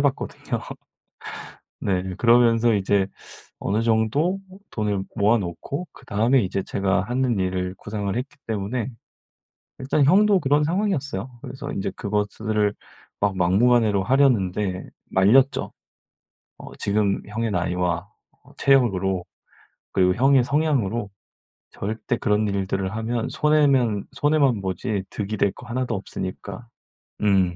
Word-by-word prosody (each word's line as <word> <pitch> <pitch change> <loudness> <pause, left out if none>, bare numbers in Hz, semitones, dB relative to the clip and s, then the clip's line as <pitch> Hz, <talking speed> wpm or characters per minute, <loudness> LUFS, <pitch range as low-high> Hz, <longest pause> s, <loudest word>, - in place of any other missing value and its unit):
봤거든요. 140 -1 -1 1.2
네 95 -1 -1
그러면서 115 -1 +4
이제 100 0 +2 0.5
어느 105 +3 0
정도 115 - +1 0.3
돈을 105 -3 -1
모아 110 +2 +3
놓고 105 - -5
그다음에 115 +5 +1
이제 95 0 -2
제가 95 -1 0
하는 120 +1 0
일을 90 0 -1
구상을 100 -2 -3
했기 130 +4 -4
때문에 110 +4 -2 0.9
일단 140 +2 +1
형도 200 +6 +5
그런 145 -2 +2
상황이었어요. 150 - -1
그래서 140 +2 -6
인제 95 - -2
그것을 105 0 -1 0.5
막 100 -2 +1
막무가내로 105 +2 +3
하려는데 105 -8 +1 0.2
말렸죠. 120 +9 +3 0.9
어 - - -10
지금 100 -1 +1
형의 110 +2 -2
나이와 90 0 -1 0.5
체력으로 95 -9 +2 0.7
그리고 90 -1 +3
형의 135 +1 +4
성향으로 125 -7 0 0.6
절대 110 +4 -3
그런 105 -1 +1
일들을 95 -1 -1
하면 115 +3 -2
손해면 135 -7 +2
손해만 140 -5 +2
보지 95 +2 -2
득이 105 +1 -3
될 100 -1 +2
거 125 - -13
하나도 125 0 -2
없으니까. 100 +2 -6 0.5
음. 95 -4 +3
110 Hz, 270 characters per minute, -23 LUFS, 95-130 Hz, 1.2 s, 형도